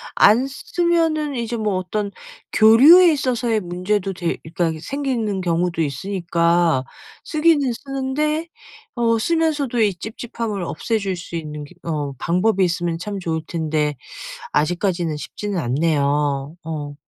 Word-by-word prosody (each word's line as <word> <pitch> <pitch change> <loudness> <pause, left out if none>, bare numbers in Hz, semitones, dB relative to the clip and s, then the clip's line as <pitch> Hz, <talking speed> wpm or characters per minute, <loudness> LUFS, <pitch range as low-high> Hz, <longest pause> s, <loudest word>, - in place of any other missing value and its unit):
안 235 +6 +5
쓰 275 - -10
쓰면은 325 -4 +1
이제 235 0 -3
뭐 215 -3 -1
어떤 200 +3 -2 0.4
교류에 290 +12 +8
있어서의 245 -5 0
문제도 185 +2 -1
돼 175 -2 -2
일단 165 -1 -2
생기는 240 - -2
경우도 170 -1 0
있으니까 170 -1 +1 0.4
쓰기는 305 -4 +2
쓰는데 285 +5 -2 0.5
어 230 -1 +2
쓰면서도 300 -3 0
이 210 -3 +3
찝찝함을 220 0 -5
없애줄 200 +3 -2
수 175 -1 -8
있는 150 -2 -5 0.2
그 - - -10
어 145 -3 -2
방법이 185 - +1
있으면 170 -1 -1
참 200 +2 -4
좋을 165 -3 -2
텐데 155 -3 -1 0.6
아직까지는 170 0 0
쉽지는 205 +4 -4
않네요. 145 +1 0
어 150 -3 -5
195 Hz, 280 characters per minute, -21 LUFS, 165-245 Hz, 0.6 s, 교류에